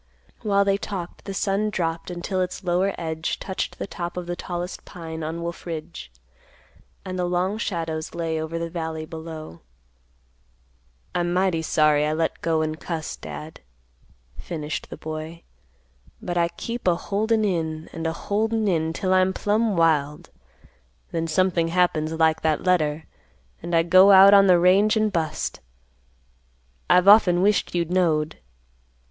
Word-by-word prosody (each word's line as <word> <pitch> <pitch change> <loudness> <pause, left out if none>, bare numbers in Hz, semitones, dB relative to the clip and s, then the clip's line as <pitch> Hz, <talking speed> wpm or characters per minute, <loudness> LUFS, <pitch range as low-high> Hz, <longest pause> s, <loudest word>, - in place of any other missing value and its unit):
While 200 -1 +2
they 195 0 +2
talked, 185 -4 -6
the 195 - -5
sun 200 +2 0
dropped 165 -4 -3
until 180 +2 -3
its 185 +2 -4
lower 185 +2 +1
edge 160 -1 -3
touched 190 - -4
the - - -4
top 175 -2 -6
of 180 - -4
the 175 0 -4
tallest 175 +1 -5
pine 165 -2 -8
on 160 +2 -4
Wolf 170 +1 -6
Ridge, 155 - -7 0.9
and 185 -1 -4
the 180 - +1
long 180 +4 -1
shadows 165 -7 -3
lay 165 -2 -2
over 160 +1 -4
the 170 0 -3
valley 160 -2 -4
below. 160 - -9 1.5
"I'm 175 0 0
mighty 180 -2 +1
sorry 155 -2 +3
I 155 - 0
let 160 +1 -2
go 160 -1 +1
and 155 0 -3
cuss, 165 -3 -4
Dad," 155 +1 -9 0.8
finished, 155 -3 -5
the - - -8
boy. 155 +2 -7 0.8
"But 175 - -4
I 170 -1 +3
keep 230 +6 -6
a 175 - +4
holdin' 215 +4 0
in, 160 -4 -2
and 165 0 -3
a 160 - -1
holdin' 220 +4 -1
in, 160 -3 0
'til 185 +2 0
I'm 185 0 +3
plumb 210 0 0
wild; 150 -3 +1 0.8
then 165 -1 -2
something 170 0 +1
happens 165 -3 +1
like 160 -1 +2
that 155 -1 0
letter, 160 -4 +1 0.6
and 170 +1 -2
I 165 - +4
go 185 +3 +6
out 195 0 +9
on 200 -1 +7
the 180 -1 +6
range 195 +5 +4
and 215 -1 +1
bust. 155 -3 -2 1.3
I've 180 +1 +5
often 195 -4 +6
wished 205 -2 +1
you 170 -1 +1
knowed. 160 -3 0
170 Hz, 155 wpm, -24 LUFS, 160-190 Hz, 1.5 s, out